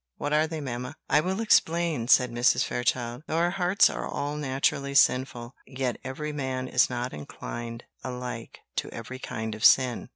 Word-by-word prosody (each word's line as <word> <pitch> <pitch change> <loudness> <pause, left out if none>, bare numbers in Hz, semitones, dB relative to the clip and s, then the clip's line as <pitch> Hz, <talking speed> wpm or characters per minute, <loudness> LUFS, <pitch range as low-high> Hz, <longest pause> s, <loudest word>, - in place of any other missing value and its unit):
What 145 +1 -2
are 155 +1 +3
they, 160 -1 -5
mamma?" 125 +1 -5 0.2
"I 150 - +6
will 190 +4 -2
explain," 170 - +2
said 125 -1 +5
Mrs. 120 +1 +3
Fairchild. 120 0 -1
"Though 160 - -1
our 170 +1 +2
hearts 185 +1 +4
are - - -4
all 145 +1 -3
naturally 140 -1 -1
sinful, 125 -2 +2
yet 130 -2 -2
every 150 +4 -4
man 130 -3 -3
is 125 - +3
not 125 0 -3
inclined 115 - -7 0.2
alike 125 -2 -6 0.2
to - - -1
every 130 +3 -8
kind 110 -3 -4
of 105 +1 -8
sin. 130 -2 +4
130 Hz, 170 wpm, -27 LUFS, 120-150 Hz, 0.2 s, I